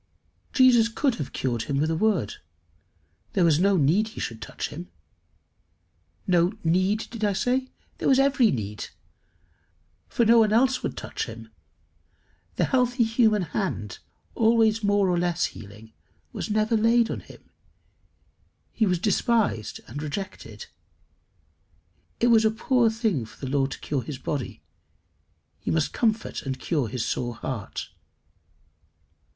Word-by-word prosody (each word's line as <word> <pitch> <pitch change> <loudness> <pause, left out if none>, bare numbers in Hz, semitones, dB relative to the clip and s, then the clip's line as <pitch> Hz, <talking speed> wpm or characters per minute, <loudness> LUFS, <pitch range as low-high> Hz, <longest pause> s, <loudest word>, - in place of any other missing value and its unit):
] - - -43
Jesus 250 -4 +6
could 260 +3 0
have 140 - -5
cured 120 -4 -2
him 140 - -1
with 155 +3 +1
a - - 0
word. 185 - 0 1.0
There 180 - +3
was 160 -2 +4
no 195 +1 +3
need 170 +9 +3
he 220 - -9
should 115 -1 -5
touch - - -5
him. 90 - -8 1.4
No 175 -1 +3
need 185 +6 +1
did 230 -2 -6
I 205 -1 +2
say? 255 +6 0 0.3
There - - +1
was 265 - +5
every 270 -4 +4
need. 105 - -4 1.2
For 235 - +1
no 230 +1 +6
one 215 -2 +4
else 250 +3 +3
would - - -4
touch - - -4
him. 115 -1 -10 1.1
The - - +2
healthy 250 -2 +2
human 220 -3 +2
hand, 155 - -3 0.3
always 225 -1 +3
more 205 -1 +3
or 175 -1 +1
less 175 0 +1
healing, 105 +2 -10 0.4
was - - -4
never 215 +2 +1
laid 230 +1 +3
on - - -3
him; - - -16 1.2
he 220 - +1
was 180 -1 +2
despised 205 - 0
and 140 +7 -7
rejected. 155 +6 -6 1.5
It 240 - +3
was 225 -1 +5
a 220 - +4
poor 230 +2 +2
thing 220 - -1
for 110 - -13
the 135 -1 -5
Lord 135 -1 +1
to - - -7
cure 140 -3 -2
his 130 +3 -6
body; 140 -1 -4 1.0
he - - -5
must 160 -2 0
comfort 225 -1 0
and 135 -1 -4
cure 150 -8 -1
his 115 +1 -3
sore 120 -1 -2
heart. 115 -2 -5
195 Hz, 145 wpm, -25 LUFS, 140-225 Hz, 1.5 s, Jesus